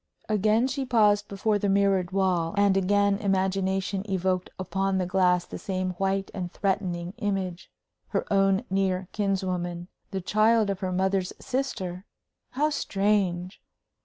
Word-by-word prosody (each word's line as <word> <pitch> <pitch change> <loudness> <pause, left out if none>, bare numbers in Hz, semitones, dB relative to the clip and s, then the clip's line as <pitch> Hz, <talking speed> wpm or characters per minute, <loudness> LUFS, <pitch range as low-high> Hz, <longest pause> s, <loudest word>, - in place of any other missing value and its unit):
Again 215 +3 +2
she 270 +1 -2
paused 210 -5 +3
before 205 +1 0
the 200 - 0
mirrored 195 -2 +2
wall; 185 -2 0
and 200 -1 +4
again 200 +1 +2
imagination 195 -1 0
evoked 185 -1 0
upon 195 +1 -1
the 185 - 0
glass 180 -1 +2
the - - -8
same 185 -1 -2
white 195 +2 -1
and 180 -3 -4
threatening 185 -3 -2
image 190 -4 -3 0.4
her - - -1
own 195 +2 +3
near 190 -1 0
kinswoman 185 -3 -2 0.2
the 195 - -3
child 215 +2 +3
of 195 - -4
her 185 -1 -2
mother's 190 0 0
sister! 205 -8 -3 0.5
How 300 +4 +1
strange! 195 -6 0
195 Hz, 135 wpm, -26 LUFS, 185-205 Hz, 0.5 s, and